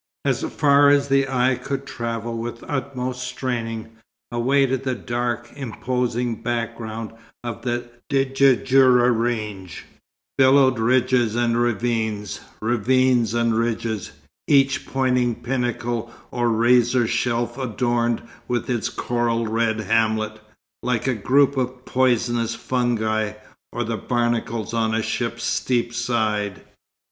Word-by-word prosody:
As -, -, +1 dB
far 145 Hz, -1 st, +4 dB
as 140 Hz, 0 st, +3 dB
the 135 Hz, 0 st, +3 dB
eye 130 Hz, 0 st, +2 dB
could 135 Hz, +2 st, -4 dB
travel 115 Hz, -2 st, -4 dB
with 115 Hz, +1 st, -5 dB
utmost 130 Hz, -2 st, -3 dB
straining, 120 Hz, -3 st, -3 dB, 0.5 s
away 130 Hz, +4 st, +2 dB
to 130 Hz, 0 st, 0 dB
the 130 Hz, 0 st, -2 dB
dark, 120 Hz, 0 st, -3 dB
imposing 125 Hz, -2 st, -2 dB
background 115 Hz, -2 st, -3 dB, 0.3 s
of 120 Hz, -2 st, -5 dB
the 120 Hz, 0 st, -2 dB, 0.2 s
Djurdjura 135 Hz, -2 st, +4 dB
range, 110 Hz, -6 st, -3 dB, 0.5 s
billowed 130 Hz, -2 st, +5 dB
ridges 125 Hz, -1 st, +2 dB
and 120 Hz, -1 st, +1 dB
ravines, 110 Hz, -3 st, -1 dB, 0.2 s
ravines 120 Hz, 0 st, +2 dB
and 115 Hz, -1 st, +2 dB
ridges, 115 Hz, -2 st, -2 dB, 0.4 s
each 135 Hz, -2 st, +3 dB
pointing 125 Hz, -3 st, +1 dB
pinnacle 120 Hz, -2 st, -2 dB, 0.2 s
or 120 Hz, -1 st, 0 dB
razor 120 Hz, +1 st, +3 dB
shelf 120 Hz, +1 st, -1 dB
adorned 120 Hz, -1 st, 0 dB, 0.2 s
with 120 Hz, 0 st, -1 dB
its 120 Hz, -3 st, -1 dB
coral 120 Hz, -1 st, -1 dB
red 110 Hz, 0 st, 0 dB
hamlet, 110 Hz, 0 st, 0 dB, 0.4 s
like 125 Hz, -3 st, -1 dB
a 130 Hz, -, +2 dB
group 135 Hz, +5 st, +3 dB
of 130 Hz, 0 st, -3 dB
poisonous 120 Hz, -2 st, +1 dB
fungi, 110 Hz, -4 st, 0 dB, 0.4 s
or 120 Hz, -, -2 dB
the 115 Hz, 0 st, -3 dB
barnacles 120 Hz, -3 st, -1 dB
on 110 Hz, -1 st, +1 dB
a 110 Hz, -, 0 dB
ship's 115 Hz, 0 st, -3 dB
steep 120 Hz, -1 st, 0 dB
side. 110 Hz, -5 st, -1 dB
120 Hz, 115 wpm, -22 LUFS, 115-130 Hz, 0.5 s, billowed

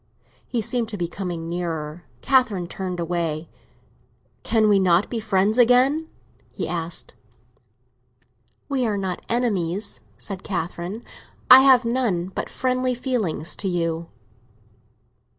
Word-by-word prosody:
He 240 Hz, -, -1 dB
seemed 230 Hz, +1 st, -1 dB
to 210 Hz, -, -5 dB
be 175 Hz, -2 st, -1 dB
coming 175 Hz, -2 st, -5 dB
nearer; 165 Hz, -2 st, -4 dB, 0.2 s
Catherine 225 Hz, -10 st, +2 dB
turned 180 Hz, 0 st, -5 dB
away. 170 Hz, -2 st, -2 dB, 0.9 s
"Can 220 Hz, -2 st, +2 dB
we 205 Hz, -2 st, +5 dB
not 180 Hz, 0 st, +3 dB
be 235 Hz, -, -1 dB
friends 210 Hz, +1 st, +1 dB
again?" 255 Hz, +6 st, +4 dB, 0.4 s
he -, -, -4 dB
said. 170 Hz, -1 st, -4 dB, 1.5 s
"We 265 Hz, -4 st, 0 dB
are 210 Hz, -2 st, -1 dB
not 190 Hz, -2 st, -3 dB
enemies," 205 Hz, -5 st, -1 dB, 0.2 s
said 195 Hz, -2 st, -7 dB
Catherine. 180 Hz, +4 st, -4 dB, 0.5 s
"I 255 Hz, -, +13 dB
have 260 Hz, -2 st, +6 dB
none 230 Hz, -8 st, 0 dB
but -, -, -5 dB
friendly 255 Hz, 0 st, 0 dB
feelings 230 Hz, -, -2 dB
to 195 Hz, -, -2 dB
you." 165 Hz, -2 st, -1 dB
195 Hz, 120 wpm, -23 LUFS, 175-240 Hz, 1.5 s, I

